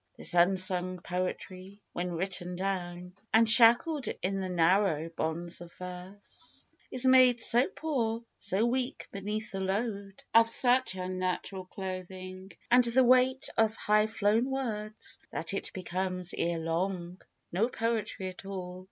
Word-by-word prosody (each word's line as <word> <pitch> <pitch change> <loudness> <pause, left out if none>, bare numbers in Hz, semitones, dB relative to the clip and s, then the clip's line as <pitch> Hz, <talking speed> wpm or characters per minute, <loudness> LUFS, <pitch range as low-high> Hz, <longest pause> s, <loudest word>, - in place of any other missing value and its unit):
This - - +2
unsung 185 0 +2
poetry, 185 +2 -5
when 175 0 -3
written 180 0 -3
down 180 -1 -4 0.2
And 225 0 +5
shackled 240 +5 +5 0.2
in 195 +1 -1
the 190 -1 -3
narrow 170 -2 +2
bonds 165 +1 -3
of 170 -1 -10
verse, 185 - -10 0.2
Is 255 0 +3
made 255 -2 +6
so 240 +2 +5
poor, 235 -7 -2
so 200 +5 0
weak 250 +1 -2
beneath 210 +2 -4
the 195 - -4
load 200 0 -3
Of 230 0 +6
such 250 -2 +1
unnatural 185 +1 -3
clothing, 185 0 -7 0.2
and 250 +1 +6
the 240 +2 +3
weight 255 +1 +3
Of 220 0 +3
high 210 0 +2
flown 220 +3 +1
words, 220 -5 -3
that - - -4
it - - -4
becomes 185 -1 -3
ere 170 0 -1
long^ 175 +2 -3 0.3
No 200 +7 +1
poetry 225 -5 -2
at 185 - -11
all. 185 -2 -6
195 Hz, 135 wpm, -30 LUFS, 180-230 Hz, 0.3 s, made